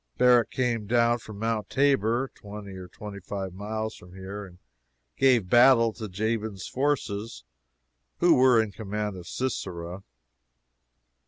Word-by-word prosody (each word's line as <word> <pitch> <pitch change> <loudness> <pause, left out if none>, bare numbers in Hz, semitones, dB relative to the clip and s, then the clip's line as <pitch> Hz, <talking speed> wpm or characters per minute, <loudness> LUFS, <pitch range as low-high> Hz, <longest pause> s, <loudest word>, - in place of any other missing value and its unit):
Barak 125 -2 +5
came 120 -5 -1
down 120 +1 +3
from 110 -2 -10
Mount 110 -1 -2
Tabor, 135 -2 +2
twenty 105 -1 -9
or 95 -1 -8
twenty 100 +2 -9
five 95 -1 -5
miles 110 +3 -4
from 90 +1 -15
here, 95 +2 -7
and 90 -1 -17 0.6
gave 125 -8 +3
battle 120 0 +6
to 110 -2 -7
Jabin's 110 0 -2
forces, 115 - -2 0.7
who - - +5
were 125 -2 +5
in 110 -2 0
command 105 0 -4
of 90 -2 -10
Sisera. 90 -8 -4
110 Hz, 135 wpm, -27 LUFS, 100-120 Hz, 0.7 s, battle